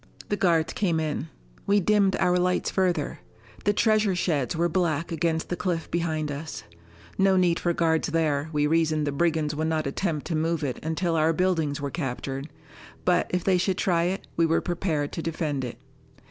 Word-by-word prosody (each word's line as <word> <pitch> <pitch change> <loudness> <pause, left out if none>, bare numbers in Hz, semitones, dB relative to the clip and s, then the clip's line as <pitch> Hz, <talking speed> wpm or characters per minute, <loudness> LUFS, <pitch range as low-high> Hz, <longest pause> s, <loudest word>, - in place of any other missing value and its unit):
The 205 - +1
guards 165 -5 +2
came 170 -6 +1
in. 155 0 -2 0.4
We 205 +1 +4
dimmed 200 0 +3
our 180 0 +2
lights 180 0 +1
further. 180 -6 0 0.5
The 205 - +4
treasure 215 -2 +3
sheds 160 -5 0
were 170 +1 +2
black 170 -2 0
against 160 0 -1
the 175 - -1
cliff 175 -3 -2
behind 155 -3 -1
us. 150 +2 -6 0.6
No 195 -1 +4
need 175 -2 +3
for 175 - +1
guards 165 -1 +1
there 155 -2 0
we 150 -1 +1
reasoned 155 -1 +2
the 145 - 0
brigands 155 0 +1
would 155 +2 -1
not 160 -1 0
attempt 150 +2 -2
to 170 - -2
move 160 +1 0
it 130 -3 -3
until 165 +2 -1
our 160 +1 +3
buildings 160 -5 0
were 140 -1 -3
captured. 135 -1 -4 0.6
But, 180 -1 +3
if 180 -1 -1
they 185 -2 +3
should 185 0 0
try 170 -2 +2
it, 190 +2 -2
we 165 0 +3
were 165 - +3
prepared 165 -5 -2
to - - -4
defend 155 -4 -2
it. 120 -2 -5
165 Hz, 190 wpm, -26 LUFS, 155-180 Hz, 0.6 s, We